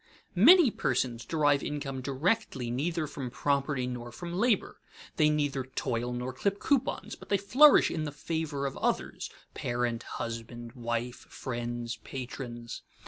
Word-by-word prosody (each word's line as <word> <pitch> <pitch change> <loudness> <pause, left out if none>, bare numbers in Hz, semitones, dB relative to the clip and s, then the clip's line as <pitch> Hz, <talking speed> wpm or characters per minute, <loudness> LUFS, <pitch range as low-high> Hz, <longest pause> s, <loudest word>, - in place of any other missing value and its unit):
_ - - -36 0.3
Many 280 - +8
persons 120 - -1
derive 145 -3 +2
income 140 -3 -4
directly 135 - 0
neither 160 +6 -1
from 140 -3 -5
property 140 0 0
nor 120 -1 -5
from 170 +4 -7
labor. 210 +2 +1 0.4
They 155 -1 +5
neither 145 -3 0
toil 125 -2 -2
nor 125 +1 -3
clip 200 +9 0
coupons, 275 +2 0
but - - -15
they 200 - +3
flourish 260 +10 +6
in 155 -2 -2
the 145 - -3
favor 150 -1 -3
of 135 - -3
others - - -1 0.2
parent, 120 -1 -1 0.2
husband, 115 +1 -5
wife, 120 0 -3
friends, 120 -1 -4
patrons. 120 -2 -7
135 Hz, 140 wpm, -30 LUFS, 120-160 Hz, 0.4 s, Many